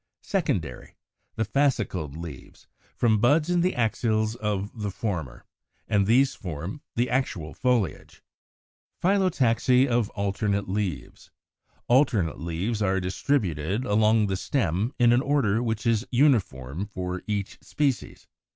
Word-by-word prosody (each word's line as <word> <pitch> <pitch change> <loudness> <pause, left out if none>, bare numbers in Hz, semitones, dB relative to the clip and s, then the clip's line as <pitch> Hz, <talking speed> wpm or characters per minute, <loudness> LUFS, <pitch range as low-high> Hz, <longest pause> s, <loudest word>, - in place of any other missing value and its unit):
secondary, - - -2 0.4
the 110 - 0
fascicled 100 - 0
leaves, 80 -6 -10 0.3
from 110 -3 +2
buds 150 +8 +3
in 175 -1 +3
the 185 +2 +1
axils 110 -2 0
of 105 0 -3
the 105 - -1
former, 85 - -4 0.4
and 100 -2 +2
these 130 +4 +4
form 90 - -6
the 120 +1 +1
actual 110 - -2
foliage. 125 -6 -1 0.8
185. 180 - +2
=Phyllotaxy 130 +1 +3
of 120 -4 +1
Alternate 100 0 -1
Leaves.= 95 -6 -4 0.6
Alternate 120 - +2
leaves 85 +8 -2
are 95 -1 +2
distributed 95 - -1
along 110 0 +3
the 95 -1 -1
stem 100 - -1
in 120 -1 +5
an 120 - +3
order 130 -7 +1
which 115 -1 -2
is 115 -2 +2
uniform 100 - +1
for 90 -1 -4
each 100 -2 -3
species. 140 -8 -2
110 Hz, 125 wpm, -26 LUFS, 95-125 Hz, 0.8 s, in